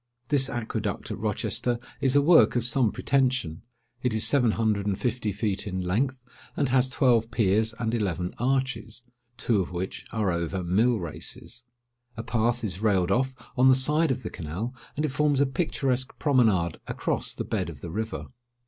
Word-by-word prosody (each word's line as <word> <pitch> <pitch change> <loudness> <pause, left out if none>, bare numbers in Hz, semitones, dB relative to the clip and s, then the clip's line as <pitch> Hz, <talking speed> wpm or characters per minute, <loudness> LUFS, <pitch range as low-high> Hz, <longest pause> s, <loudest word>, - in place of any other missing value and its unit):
This 135 -2 +3
aqueduct 110 -4 -3
at - - -5
Rochester 120 -1 0 0.2
is 135 0 +2
a 145 - +5
work 165 -3 +6
of 120 -1 +1
some 125 -3 +3
pretension. 125 - 0 0.4
It 125 -4 0
is 110 - +2
seven 125 -5 +4
hundred 105 -3 0
and 100 -2 0
fifty 115 -3 -1
feet 105 0 -2
in 95 -1 -3
length, 125 +8 -1 0.3
and 140 -3 +1
has 130 0 +3
twelve 125 -6 +2
piers 110 -1 +1
and 115 -1 -2
eleven 90 -6 -1
arches, 130 -2 -1 0.3
two 110 -5 +1
of 90 - -5
which 90 +2 -5
are 105 -4 0
over 85 +2 -2
Mill 110 +7 +2
races. 105 +7 -5 0.5
A 115 - -4
path 120 +1 0
is 95 -2 -4
railed 95 -4 +2
off 130 +4 +1 0.2
on 130 +1 +5
the 130 - +7
side 150 +5 +3
of 130 -1 -2
the - - -5
canal, 90 - -5 0.2
and 150 - +1
it - - 0
forms 145 0 +1
a 140 - +4
picturesque 135 -3 -1
promenade 110 - +2
across - - -2
the - - -4
bed - - -2
of - - -10
the 85 - -6
river. 110 +4 -4
115 Hz, 180 wpm, -26 LUFS, 100-130 Hz, 0.5 s, the